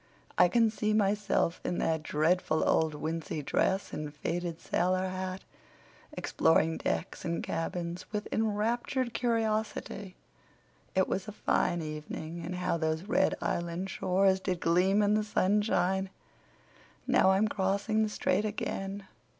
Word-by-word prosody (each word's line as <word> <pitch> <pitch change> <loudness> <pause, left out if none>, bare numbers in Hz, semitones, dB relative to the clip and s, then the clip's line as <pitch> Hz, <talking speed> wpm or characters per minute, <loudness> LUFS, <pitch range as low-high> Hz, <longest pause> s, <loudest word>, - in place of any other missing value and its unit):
I 180 - +6
can 230 +2 +3
see 215 -1 0
myself, 205 -4 +1
in 180 - -2
that 160 -1 0
dreadful 155 +2 +1
old 160 -2 +2
wincey 155 0 -3
dress 190 +6 0
and 150 -1 -4
faded 170 +3 -3
sailor 185 +1 0
hat, 185 0 -4 0.7
exploring 160 0 +2
decks 80 -1 -3
and 170 0 -2
cabins 170 +2 -4
with 210 -1 -3
enraptured 230 +4 0
curiosity. 220 -4 -1 0.8
It 190 0 +3
was 190 +2 -2
a - - -4
fine 175 -4 0
evening; 155 +2 -6
and 175 +2 -4
how 180 -1 0
those 160 0 -1
red 220 +6 +2
Island 170 +3 -2
shores 190 +1 +2
did 185 -2 -2
gleam 185 +5 +3
in 205 0 +3
the 215 0 +2
sunshine. 190 -2 +1 1.0
Now - - +4
I'm 200 +3 +3
crossing 200 +2 0
the 215 - +1
strait 205 -1 0
again. 200 -1 -3
185 Hz, 135 wpm, -30 LUFS, 170-210 Hz, 1.0 s, I